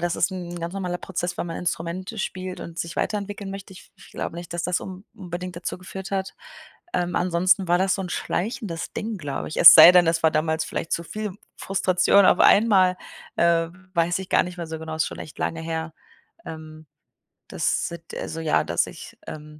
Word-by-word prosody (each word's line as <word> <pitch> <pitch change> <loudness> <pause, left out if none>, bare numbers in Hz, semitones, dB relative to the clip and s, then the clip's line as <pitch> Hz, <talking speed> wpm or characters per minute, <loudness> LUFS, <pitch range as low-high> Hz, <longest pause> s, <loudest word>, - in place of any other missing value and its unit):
das 175 0 -1
ist 185 - +1
'n 175 -2 -6
ganz 170 +1 -5
normaler 180 -2 -3
Prozess, 175 -1 -4
wenn - - -2
man 165 - -5
Instrumente 180 +4 -4
spielt 185 -1 -4
und 170 0 -9
sich 170 0 -4
weiterentwickeln 205 -1 -3
möchte, 195 0 -8
ich - - -16
ich - - -17
glaube 170 - -5
nicht, 175 0 -8
dass 170 - -2
das 180 0 0
un 190 +1 -9
unbedingt 180 -2 -7
dazu 175 - -4
geführt 190 +1 -8
hat. 195 -1 -2 0.6
Ähm, 175 0 -1
ansonsten 185 +1 +2
war 175 - +4
das 190 0 +2
so - - -4
'n 180 - -5
schleichendes 180 -4 -3
Ding, 220 -2 -4
glaube 145 -3 -4
ich. - - -5
Es 170 - +12
sei 175 - +11
denn, 180 -2 +6
das 165 0 +1
war 160 - +5
damals 160 +1 0
vielleicht 165 - -5
zu 170 - -1
viel 215 +1 -5 0.3
Frustration 190 +1 +3
auf - - +5
einmal, 195 -4 +5 0.4
äh, 165 -1 +3 0.3
weiß 170 +2 +1
ich 190 - -8
gar - - +4
nicht 180 0 -8
mehr 170 - -4
so 160 0 -6
genau, 160 0 -6
ist 160 - +1
schon - - -7
echt 155 - -10
lange 165 - -2
her. 160 -1 -4 0.5
Ähm, 155 -1 -9 0.6
das - - -1
sit 170 0 -10
also, 165 - -5
ja, 160 -1 +2
dass 85 - 0
ich, - - -11
ähm, 150 0 -9
175 Hz, 210 wpm, -24 LUFS, 165-185 Hz, 0.6 s, Es